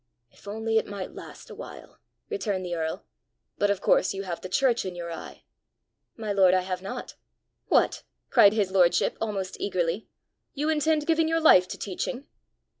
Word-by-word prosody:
"If -, -, -19 dB
only 220 Hz, +2 st, 0 dB
it -, -, -6 dB
might 200 Hz, -2 st, -6 dB
last -, -, -11 dB
a -, -, -7 dB
while!" -, -, -11 dB, 0.3 s
returned 205 Hz, -, -2 dB
the 175 Hz, -, -4 dB
earl. 165 Hz, +3 st, -3 dB, 0.5 s
"But 205 Hz, -, +3 dB
of 200 Hz, -2 st, 0 dB
course 190 Hz, -, +3 dB
you 195 Hz, -, -4 dB
have 175 Hz, -3 st, -5 dB
the 185 Hz, -, -7 dB
church 245 Hz, +3 st, +2 dB
in 185 Hz, -2 st, -5 dB
your 170 Hz, -1 st, -6 dB
eye!" 165 Hz, -, -9 dB, 0.7 s
"My 215 Hz, -2 st, -3 dB
lord, 190 Hz, -2 st, +5 dB
I 185 Hz, -, +3 dB
have 185 Hz, 0 st, -4 dB
not." 195 Hz, -, -6 dB, 0.5 s
"What!" -, -, +2 dB, 0.3 s
cried 200 Hz, 0 st, +7 dB
his 205 Hz, -4 st, 0 dB
lordship 175 Hz, -2 st, +3 dB
almost 195 Hz, -4 st, -3 dB
eagerly; 180 Hz, +1 st, -1 dB, 0.5 s
"you 295 Hz, +2 st, -1 dB
intend 310 Hz, 0 st, +1 dB
giving 325 Hz, 0 st, +2 dB
your 325 Hz, 0 st, +1 dB
life 185 Hz, -, +6 dB
to -, -, -6 dB
teaching?" 245 Hz, +7 st, -4 dB
200 Hz, 180 wpm, -26 LUFS, 185-230 Hz, 0.7 s, cried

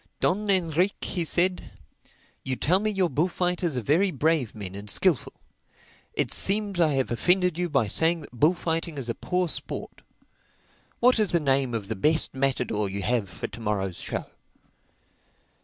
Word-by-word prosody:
"Don 205 Hz, +3 st, +1 dB
Enrique," 180 Hz, 0 st, +1 dB
he 175 Hz, -, -1 dB
said, 180 Hz, +3 st, +1 dB, 0.7 s
"you 130 Hz, -1 st, -2 dB
tell 180 Hz, +8 st, +2 dB
me 215 Hz, +1 st, 0 dB
your 195 Hz, -3 st, +1 dB
bullfighters 175 Hz, -1 st, 0 dB
are 125 Hz, -, -2 dB
very 170 Hz, -, +3 dB
brave 155 Hz, -, 0 dB
men 100 Hz, -3 st, -6 dB
and 100 Hz, +1 st, -8 dB
skilful. 170 Hz, -, +1 dB, 0.8 s
It -, -, 0 dB
seems 200 Hz, -1 st, +1 dB
I 160 Hz, -3 st, +4 dB
have 130 Hz, -2 st, 0 dB
offended 180 Hz, +7 st, +2 dB
you 175 Hz, +1 st, -1 dB
by 135 Hz, -7 st, +2 dB
saying 165 Hz, -, +1 dB
that 145 Hz, -, -12 dB
bullfighting 165 Hz, +4 st, 0 dB
is 125 Hz, -3 st, -5 dB
a -, -, +1 dB
poor 180 Hz, +8 st, -1 dB
sport. -, -, -5 dB, 1.0 s
What 250 Hz, -1 st, +5 dB
is 210 Hz, -3 st, +2 dB
the 170 Hz, -, +2 dB
name 135 Hz, -4 st, +1 dB
of 105 Hz, -3 st, -4 dB
the 110 Hz, -, -2 dB
best 155 Hz, +11 st, +1 dB
matador 125 Hz, -6 st, 0 dB
you 100 Hz, 0 st, -4 dB
have 115 Hz, -2 st, 0 dB
for 90 Hz, -, -6 dB
to 115 Hz, -, -7 dB
morrow's 100 Hz, -5 st, -2 dB
show?" -, -, -4 dB
160 Hz, 165 wpm, -26 LUFS, 120-180 Hz, 1.0 s, What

